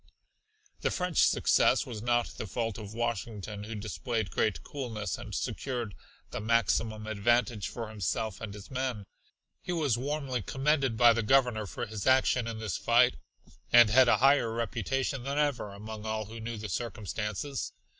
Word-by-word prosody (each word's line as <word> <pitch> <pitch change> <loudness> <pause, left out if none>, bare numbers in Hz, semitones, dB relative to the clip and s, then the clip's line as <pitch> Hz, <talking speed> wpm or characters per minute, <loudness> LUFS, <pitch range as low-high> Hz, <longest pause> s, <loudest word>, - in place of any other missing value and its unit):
The - - 0
French 180 -2 -1
success - - +4
was 110 -4 -6
not 120 +1 +2
the 110 - -7
fault 115 +2 -3
of 105 0 -8
Washington 105 -2 -3
who 115 +1 -6
displayed 110 +1 -3
great 95 -8 0
coolness 110 - -4
and - - -7
secured 120 -6 -3 0.4
the - - -3
maximum 110 -1 +1
advantage 110 +1 +1
for 115 -2 -5
himself 110 0 -3
and 110 -3 -5
his 100 +3 -11
men. 130 -6 -2 0.6
He - - -5
was 145 -9 +1
warmly 135 -2 -2
commended 135 0 +1
by 120 0 +7
the 115 - 0
Governor 120 -2 +3
for - - -4
his 110 +1 -5
action 130 -2 +4
in 115 -1 -4
this 110 -5 -3
fight - - +4 0.5
and 120 -2 +8
had 130 +2 +6
a - - +5
higher 135 -3 +4
reputation 120 +4 -2
than 140 +3 -3
ever 145 -8 0
among 110 +2 -7
all 110 0 -2
who 115 +3 -9
knew 115 0 -5
the 105 0 -5
circumstances. 110 +5 -3
115 Hz, 165 wpm, -30 LUFS, 105-125 Hz, 0.6 s, and